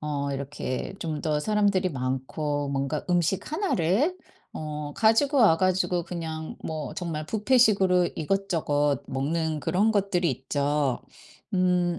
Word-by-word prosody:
어 145 Hz, -2 st, -2 dB
이렇게 140 Hz, +3 st, -4 dB
좀 155 Hz, -3 st, -3 dB
더 150 Hz, -1 st, 0 dB
사람들이 200 Hz, -2 st, +2 dB
많고 140 Hz, +2 st, -2 dB
뭔가 140 Hz, +2 st, -2 dB
음식 180 Hz, -, 0 dB
1 390 Hz, +4 st, 0 dB
를 205 Hz, -, +1 dB, 0.4 s
어 150 Hz, -1 st, -5 dB
가지고 250 Hz, +6 st, +3 dB
와 205 Hz, -10 st, +6 dB
가지고 185 Hz, -1 st, +1 dB
그냥 160 Hz, -2 st, -5 dB
뭐 155 Hz, -2 st, -4 dB
정말 160 Hz, -3 st, -4 dB
뷔페식으로 205 Hz, -5 st, +3 dB
이것저것 155 Hz, -6 st, 0 dB
먹는 155 Hz, +3 st, -1 dB
그런 185 Hz, +8 st, +2 dB
것들이 195 Hz, -6 st, +1 dB
있죠. 140 Hz, 0 st, -1 dB, 0.5 s
음 180 Hz, -1 st, +2 dB
165 Hz, 245 characters per minute, -26 LUFS, 145-190 Hz, 0.5 s, 와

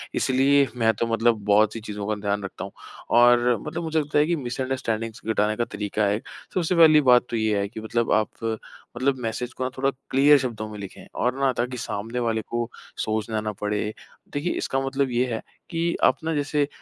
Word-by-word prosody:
इसलिए 135 Hz, +2 st, +3 dB
मैं 115 Hz, -1 st, +3 dB
तो 115 Hz, -, +1 dB
मतलब 115 Hz, -1 st, +2 dB
बहुत-सी 105 Hz, +2 st, +3 dB
चीजों 105 Hz, -2 st, -5 dB
का 110 Hz, -, 0 dB
ध्यान 100 Hz, 0 st, -1 dB
रखता 95 Hz, -, -6 dB
हूँ। 95 Hz, -, -7 dB, 0.5 s
और 120 Hz, 0 st, +5 dB
मतलब 160 Hz, +3 st, -4 dB
मुझे 160 Hz, -1 st, 0 dB
लगता 150 Hz, 0 st, +1 dB
है 150 Hz, -, +4 dB
कि 170 Hz, -, +2 dB
मिसअंडरस्टैंडिंग्स 120 Hz, -4 st, -3 dB
घटाने 110 Hz, -1 st, +1 dB
का 120 Hz, -, 0 dB
तरीका 105 Hz, 0 st, -2 dB
है 100 Hz, +1 st, +2 dB
एक। 110 Hz, -, -7 dB, 0.3 s
सबसे 180 Hz, -1 st, +1 dB
पहली 160 Hz, -2 st, +7 dB
बात 125 Hz, 0 st, +6 dB
तो -, -, -2 dB
ये 110 Hz, -2 st, +1 dB
है 100 Hz, -, -1 dB
कि 110 Hz, -, -8 dB
मतलब 115 Hz, +1 st, -1 dB
आप 110 Hz, -1 st, +2 dB, 0.7 s
मतलब 130 Hz, +2 st, +1 dB
मैसेज 120 Hz, +1 st, -3 dB
को -, -, -4 dB
ना 130 Hz, -, 0 dB
थोड़ा 135 Hz, +1 st, +2 dB, 0.2 s
क्लियर 145 Hz, +2 st, +6 dB
शब्दों 120 Hz, -5 st, -3 dB
में 105 Hz, -, -8 dB
लिखें 100 Hz, -2 st, -9 dB
और 125 Hz, +2 st, 0 dB
ना 135 Hz, -1 st, +3 dB
ताकि 125 Hz, +1 st, -1 dB
सामने 115 Hz, +1 st, -4 dB
वाले 115 Hz, -2 st, 0 dB
को 120 Hz, 0 st, -2 dB, 0.3 s
सोचना 110 Hz, 0 st, -1 dB
ना 105 Hz, 0 st, -2 dB
पड़े। 105 Hz, 0 st, 0 dB, 0.5 s
देखिए, 145 Hz, +5 st, -1 dB
इसका 135 Hz, -, -1 dB
मतलब 135 Hz, -1 st, 0 dB
ये 120 Hz, +1 st, +2 dB
है 110 Hz, -, -3 dB, 0.3 s
कि 170 Hz, 0 st, 0 dB
आप -, -, +5 dB
ना 165 Hz, 0 st, -1 dB
जैसे 145 Hz, 0 st, 0 dB
120 Hz, 205 wpm, -24 LUFS, 110-135 Hz, 0.7 s, पहली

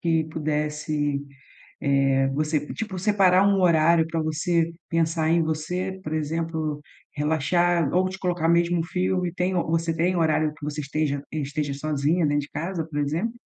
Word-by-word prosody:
que 165 Hz, -2 st, +1 dB
pudesse 150 Hz, -2 st, -2 dB, 0.6 s
eh, 135 Hz, -1 st, +2 dB
você 150 Hz, +2 st, 0 dB
tipo, 210 Hz, -4 st, -4 dB
separar 190 Hz, -1 st, +4 dB
um 200 Hz, -1 st, +3 dB
horário 165 Hz, -2 st, +4 dB
para 165 Hz, 0 st, -2 dB
você 165 Hz, +2 st, 0 dB, 0.2 s
pensar 165 Hz, -1 st, +1 dB
em 170 Hz, 0 st, +3 dB
você, 180 Hz, +5 st, -3 dB
por 155 Hz, -3 st, -6 dB
exemplo, 155 Hz, -1 st, -2 dB, 0.3 s
relaxar 160 Hz, +1 st, +1 dB
ou 185 Hz, +1 st, +2 dB
te 190 Hz, +1 st, -7 dB
colocar 175 Hz, -4 st, 0 dB
mesmo 170 Hz, +1 st, +3 dB
um -, -, +1 dB
filme, 180 Hz, 0 st, -1 dB
tem 180 Hz, 0 st, 0 dB
você 165 Hz, -1 st, 0 dB
tem 175 Hz, +3 st, +1 dB
horário 155 Hz, -2 st, +2 dB
que 145 Hz, -, -10 dB
você 150 Hz, 0 st, -3 dB
esteja 145 Hz, -1 st, -2 dB
esteja 145 Hz, -1 st, -2 dB
sozinha 155 Hz, +3 st, 0 dB
dentro 145 Hz, 0 st, +1 dB
de 140 Hz, -, -10 dB
casa, 170 Hz, -1 st, -3 dB
por 155 Hz, -2 st, -5 dB
exemplo? 160 Hz, +10 st, -1 dB
160 Hz, 160 wpm, -25 LUFS, 150-175 Hz, 0.6 s, separar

